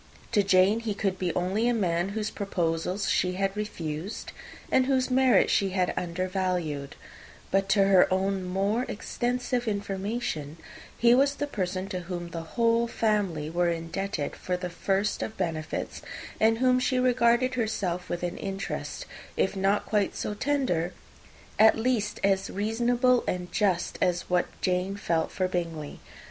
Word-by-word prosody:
To 215 -3 +4
Jane, 195 +2 +4
he 225 -3 -3
could 195 -2 -1
be 180 -2 0
only 190 +6 +1
a 245 - +2
man 175 -3 0
whose 210 -1 -2
proposals 180 0 -1
she 180 0 +2
had 195 +1 -1
refused, 180 -3 -5 0.4
and 260 0 +4
whose 260 -1 +1
merits 260 -1 +4
she 195 -2 +2
had 180 -1 +2
undervalued; 180 -5 -2 0.6
but 195 0 +1
to 200 0 +5
her 195 -2 +5
own 190 0 +1
more 195 +6 0
extensive 245 +2 -2
information, 200 -6 -3 0.4
he 235 0 +5
was 275 +3 +4
the 290 - -2
person 190 -7 -3
to 185 -3 -3
whom 175 -1 -5
the 165 - -4 0.2
whole 230 0 +3
family 205 -10 0
were 175 +2 +1
indebted 165 0 -3
for 180 -1 -2
the 180 -1 -5
first 195 +3 0
of 220 - -4
benefits, 160 -4 -3 0.4
and 225 +1 +4
whom 255 +1 +3
she 255 0 +1
regarded 250 0 +3
herself 200 -7 -2
with 175 0 -3
an 175 +1 -3
interest, 195 0 -4 0.3
if 190 - +1
not 195 +1 +1
quite 210 -2 0
so - - -3
tender, 210 - 0 0.7
at 220 +1 +7
least 225 -3 0
as 195 -1 +2
reasonable 240 +4 +2
and 180 -1 -2
just, 190 -5 0
as 175 -1 +1
what 180 -1 +3
Jane 185 +1 0
felt 165 -5 0
for 185 0 0
Bingley. 165 -5 -4
195 Hz, 155 wpm, -27 LUFS, 180-225 Hz, 0.7 s, at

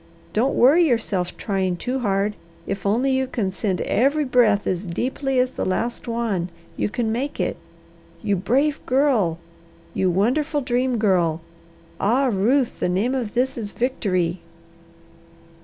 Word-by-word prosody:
Don't 250 +6 +1
worry 290 +8 +6
yourself 200 -8 -1
trying 190 -4 -1
too 255 +7 -2
hard, 205 -2 0 0.3
if 195 0 -3
only 245 +7 +2
you 265 0 +1
can 215 -7 -2
send 190 -1 -2
every 285 +6 +2
breath 235 -5 +3
as 185 +1 -2
deeply 260 +8 -2
as 250 0 +2
the - - -4
last 230 +7 -2
one, 225 -7 -1 0.3
you - - -1
can 225 +1 -1
make 265 +6 -3
it. - - 0 0.7
You 205 -2 +1
brave 270 +10 +1
girl! 250 - +2 0.6
You 190 - +1
wonderful 285 - +1
Dream 250 0 0
Girl! 180 -7 +2 0.6
Ah, 255 +5 +2
Ruth, 240 +7 +1
the - - 0
name 200 +8 +1
of 240 -5 -3
this 255 +1 0
is 205 -3 -5
victory!" 185 -8 -1
230 Hz, 145 wpm, -22 LUFS, 195-260 Hz, 0.7 s, worry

